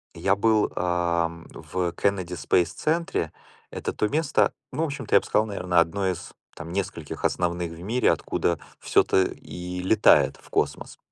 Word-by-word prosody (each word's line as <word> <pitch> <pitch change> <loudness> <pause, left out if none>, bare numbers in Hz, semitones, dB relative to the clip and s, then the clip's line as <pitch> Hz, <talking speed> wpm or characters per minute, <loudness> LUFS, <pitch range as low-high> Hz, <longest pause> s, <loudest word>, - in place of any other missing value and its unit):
я 95 - +2
был, 110 +1 +2
а, 85 -1 +1 0.2
в 90 -2 -3
Кеннеди 95 -3 -1
Спэйс 85 +1 +1
Центре. 155 - -1 0.4
Это - - -4
то 105 - 0
место, 155 +4 +2 0.2
ну, 160 - -1
в - - +2
общем-то, 140 -5 -4
я - - +8
б - - -12
сказал, 110 - +2
наверное, 90 -4 -1
одно 95 +4 +2
из 90 -1 -4 0.2
там 85 0 -7
нескольких 95 -5 -4
основных 85 -1 0
в 85 0 -10
мире, 115 +8 +2
откуда 85 -2 0 0.2
всё-то 95 - +3
и 90 0 -5
летает 105 +3 +4
в - - -20
космос. - - -2
90 Hz, 160 wpm, -25 LUFS, 85-105 Hz, 0.4 s, я